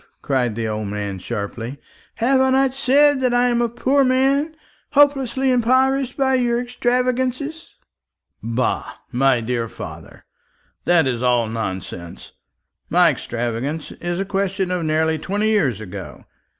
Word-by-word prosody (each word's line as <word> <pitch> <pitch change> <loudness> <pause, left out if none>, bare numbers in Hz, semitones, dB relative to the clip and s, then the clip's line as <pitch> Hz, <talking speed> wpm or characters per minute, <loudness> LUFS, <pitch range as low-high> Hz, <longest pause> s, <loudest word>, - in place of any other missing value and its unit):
cried 125 -5 0
the 115 -1 -2
old 110 -1 -3
man 100 -1 -4
sharply. 115 +6 -5 0.4
"Have 260 +3 +3
I 265 - +3
not 265 0 +3
said 275 +1 +3
that 250 -1 +2
I 245 0 +3
am 240 0 +1
a 235 - +1
poor 265 +4 +2
man, 270 +4 +2 0.4
hopelessly 270 -2 +3
impoverished 260 +2 +2
by 265 -1 +2
your 240 -2 +2
extravagance?" 255 +5 -1 0.7
"Bah, 115 +2 -2 0.2
my 130 -1 +2
dear 115 0 -2
father, - - -10 0.6
that 175 -3 +4
is 125 -3 -1
all 125 -2 +2
nonsense. 95 -6 -6 0.6
My 175 -1 +5
extravagance 120 +4 -4
is 175 +1 -4
a 195 - -1
question 195 -1 -1
of 180 -2 -1
nearly 160 0 +1
twenty 205 +6 -1
years 140 - +1
ago. 105 -5 -9
195 Hz, 135 wpm, -21 LUFS, -, 0.7 s, My